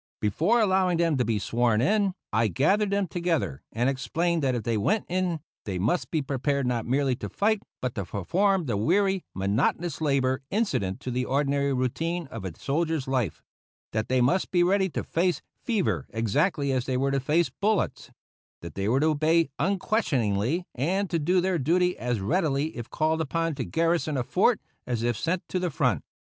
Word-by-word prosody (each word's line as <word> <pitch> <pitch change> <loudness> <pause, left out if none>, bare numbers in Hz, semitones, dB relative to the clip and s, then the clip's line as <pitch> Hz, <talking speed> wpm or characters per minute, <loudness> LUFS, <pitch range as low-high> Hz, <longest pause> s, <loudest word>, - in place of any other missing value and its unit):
Before 165 - +2
allowing 190 -4 +3
them 165 -3 +2
to 125 - +2
be 115 -2 0
sworn 115 +1 +1
in, 195 - +2 0.2
I 110 +1 +3
gathered 195 - +2
them 200 0 +1
together 165 - -1
and 120 +3 0
explained 165 +6 0
that 130 -3 +1
if 115 - -3
they 115 0 0
went 205 - +1
in 180 -3 -1 0.2
they 95 -3 -3
must 115 - 0
be 155 -3 0
prepared 140 0 -1
not 120 -2 -1
merely 135 0 +1
to - - -5
fight, 215 0 +1 0.2
but 125 -1 -2
to 100 - -4
perform 180 - +1
the 115 -6 -1
weary, 190 - +2
monotonous 135 - 0
labor 135 -3 +1
incident 135 - -1
to 130 - -4
the 125 +1 -1
ordinary 140 +1 +1
routine 160 +7 -1
of 115 - -6
a 90 -4 -7
soldier's 155 -1 -1
life; 125 - -1 0.5
that 110 0 -2
they 130 0 +3
must 135 +10 +2
be 175 -2 +3
ready 190 +1 +2
to - - -3
face 175 +1 0 0.2
fever 220 -7 0
exactly 140 - 0
as 130 -2 -1
they 130 -1 0
were 135 +1 +1
to 135 - +1
face 155 +6 +1
bullets; 215 +1 0 0.5
that 85 -2 -8
they 100 +3 -1
were 130 +4 +2
to - - +3
obey 155 +1 +2
unquestioningly, 165 - 0
and 185 +9 -1
to 170 - +1
do 180 +5 +2
their 180 -1 +1
duty 180 +6 +2
as 120 -2 -1
readily 150 - 0
if 120 -2 -6
called 160 +1 0
upon 165 +2 -1
to 135 -3 -3
garrison 165 0 0
a 125 - 0
fort - - +2 0.3
as 120 -2 -1
if 120 -1 +1
sent 165 - -1
to 185 - -1
the 180 -1 -1
front. 130 - 0
145 Hz, 190 wpm, -26 LUFS, 125-175 Hz, 0.5 s, allowing